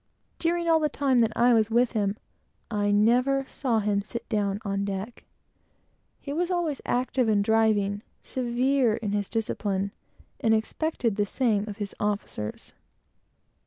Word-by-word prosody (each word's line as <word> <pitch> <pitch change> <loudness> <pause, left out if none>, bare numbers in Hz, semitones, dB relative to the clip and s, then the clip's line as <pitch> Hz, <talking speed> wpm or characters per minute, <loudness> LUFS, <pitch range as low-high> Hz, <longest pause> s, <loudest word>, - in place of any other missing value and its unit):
During 340 0 0
all 325 -1 +5
the 305 -1 +1
time 270 -3 +2
that 225 -1 +3
I 240 +1 +5
was 220 -1 +3
with 240 +1 +3
him, 205 -2 0 0.5
I 205 -1 +1
never 250 +6 +3
saw 250 -5 0
him 205 -1 +1
sit 235 +3 -7
down 205 -2 0
on 195 0 -1
deck. 200 +3 -5 0.9
He 280 - -6
was 345 +3 0
always 345 -6 -1
active 250 0 +1
and 205 -2 +3
driving; 205 -2 +2 0.2
severe 250 -1 +1
in 215 -3 -3
his 205 -1 -1
discipline, 200 -3 -1 0.5
and 225 -4 +3
expected 230 -1 -1
the 205 -1 +1
same 215 -3 +1
of 205 - -7
his 205 -2 -4
officers. 205 - -3
225 Hz, 150 wpm, -26 LUFS, 205-255 Hz, 0.9 s, all